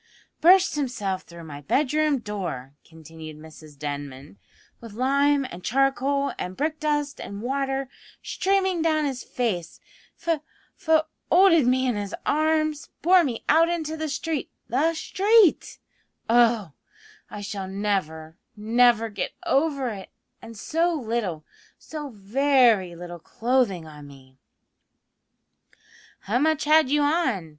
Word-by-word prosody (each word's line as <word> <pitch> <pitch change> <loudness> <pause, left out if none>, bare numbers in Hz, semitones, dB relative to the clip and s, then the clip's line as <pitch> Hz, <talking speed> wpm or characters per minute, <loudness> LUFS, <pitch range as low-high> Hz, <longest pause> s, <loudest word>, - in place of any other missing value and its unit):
"Burst 370 +3 +6
himself 230 -10 -2
through 170 -1 -13
my 145 -3 -9
bedroom 300 - +1
door," 175 - -5
continued 160 -1 -12
Mrs 155 -1 -14
Denman, 140 -6 -7 0.4
"with 230 -3 -11
lime 275 +4 +2
and 175 +1 -9
charcoal 275 +2 +1
and 180 +1 -5
brick 310 +2 -2
dust 295 -2 -1
and 200 +2 -7
water 270 +1 -2 0.4
streaming 380 -2 0
down 310 -2 +1
his 265 -3 -3
face 185 -9 -3 0.4
f 330 -3 -1 0.3
fo 315 -1 +2 0.3
olded 335 -7 +5
me 260 +1 +2
in 245 -4 0
his 205 -1 -4
arms, 310 0 0
bore 360 +2 +6
me 245 -7 -3
out 330 +2 +4
into 320 -2 -2
the 315 -1 -4
street 300 +1 -3 0.2
the 310 +7 +1
street! 405 +3 +3 0.5
Oh! 230 -6 +3 0.6
I 210 - -7
shall 200 -1 -5
never, 185 -5 -3 0.2
never 230 +1 +3
get 205 -4 -4
over 280 -4 +1
it; 195 -4 -8 0.3
and 225 -1 -11
so 330 +9 0
little, 220 - -3 0.3
so 300 -2 -7
very 230 -3 +2
little 175 0 -9
clothing 225 -3 0
on 150 -2 -12
me 130 -1 -17 0.8
" - - -31
"How 220 +5 -1
much 315 +1 +1
had 305 -2 +4
you 295 +1 +2
on?" 285 - 0
250 Hz, 130 wpm, -24 LUFS, 190-305 Hz, 0.8 s, Burst